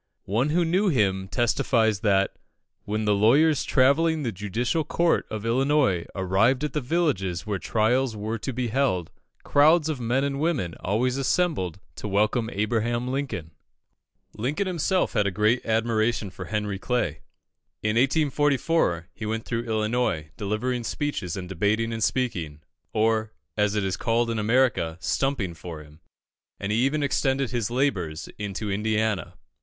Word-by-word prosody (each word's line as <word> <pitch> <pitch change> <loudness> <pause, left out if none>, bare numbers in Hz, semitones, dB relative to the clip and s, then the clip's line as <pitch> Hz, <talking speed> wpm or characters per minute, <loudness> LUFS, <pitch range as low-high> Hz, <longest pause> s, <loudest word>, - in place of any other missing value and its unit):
One 115 +9 +1
who 170 +3 +2
knew 185 +5 +2
him 95 - +1
testifies 115 -2 +1
that, 100 -2 +2 0.5
when 105 +1 -2
the 105 - +3
lawyers 140 +10 +4
travelling 155 +4 +3
the 120 - -1
judicial 110 - -1
circuit 170 +2 +1
of 110 0 -5
Illinois 130 - +2
arrived 100 +8 +2
at 150 - -2
the 150 - -1
villages 120 - 0
where 105 -3 -2
trials 115 +4 +1
were 110 +2 -3
to 130 - -3
be 125 -1 -2
held, 110 -9 0 0.3
crowds 155 +2 +4
of 150 -4 -2
men 125 +3 0
and 140 -1 -1
women 145 - 0
always 125 +7 0
assembled 135 - 0 0.2
to - - -5
welcome 105 +3 +1
Abraham 120 +4 -1
Lincoln. 130 - -3 0.8
Lincoln 140 - -1
himself 185 +1 0
had 105 -3 +2
a - - +2
great 105 +5 +1
admiration 110 -2 +1
for 90 - -8
Henry 105 0 -2
Clay. 110 - -1 0.6
In 105 +1 +1
1844, 140 - +2
he 110 - -6
went 110 +1 -3
through 115 0 -2
Illinois 110 -8 -1
delivering 115 +4 -2
speeches 115 - -3
and 90 -1 -5
debating 105 +5 0
and 115 -1 -2
speaking, 90 - -1 0.3
or, 110 0 +1 0.2
as 105 0 +1
it 105 - +1
is 95 -1 -1
called 115 0 +1
in 115 - -1
America, 110 -7 +2
"stumping" 105 -1 -1
for 80 -1 -8
him, 75 +1 -18 0.6
and 100 - -3
he 110 - +2
even 140 +4 +1
extended 135 -2 0
his 120 -5 -1
labours 100 - -1
into 105 0 -3
Indiana. 105 -3 -1
115 Hz, 150 wpm, -25 LUFS, 100-135 Hz, 0.8 s, lawyers